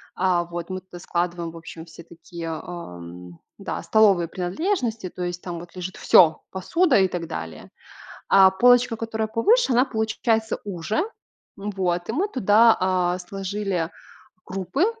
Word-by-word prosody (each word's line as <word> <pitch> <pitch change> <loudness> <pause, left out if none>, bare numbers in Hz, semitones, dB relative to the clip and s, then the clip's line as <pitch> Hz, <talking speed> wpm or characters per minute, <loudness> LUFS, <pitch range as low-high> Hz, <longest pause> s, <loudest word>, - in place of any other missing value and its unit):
а, 180 -2 +2
вот, 170 +1 -6
мы 185 0 -4
туда 180 -1 -12
складываем, 170 -1 -2
в 165 - -11
общем, 165 0 -10
все 170 0 -13
такие, 170 0 -9
ам, 90 - -8 0.2
да, - - -5
столовые 200 -6 +4
принадлежности, 220 - -2
то 180 - -6
есть 175 0 -4
там 175 -2 -5
вот 175 +1 -13
лежит 180 0 -6
всё: 160 -3 +5
посуда 260 - +2
и 190 - +4
так 175 -2 -5
далее. 80 - -7 0.6
А 190 -1 +7
полочка, 245 +3 +4
которая 220 -1 -3
повыше, 335 - +3
она 250 +3 +4
получается 220 -1 -1
уже. 195 - -4 0.6
М, 205 +1 -4
вот, 180 -3 -2
и - - +1
мы 375 +7 0
туда, 225 - +5
а, 185 -1 +1
сложили 195 -2 -3 0.5
крупы, 195 - -1
185 Hz, 150 wpm, -23 LUFS, 170-220 Hz, 0.6 s, А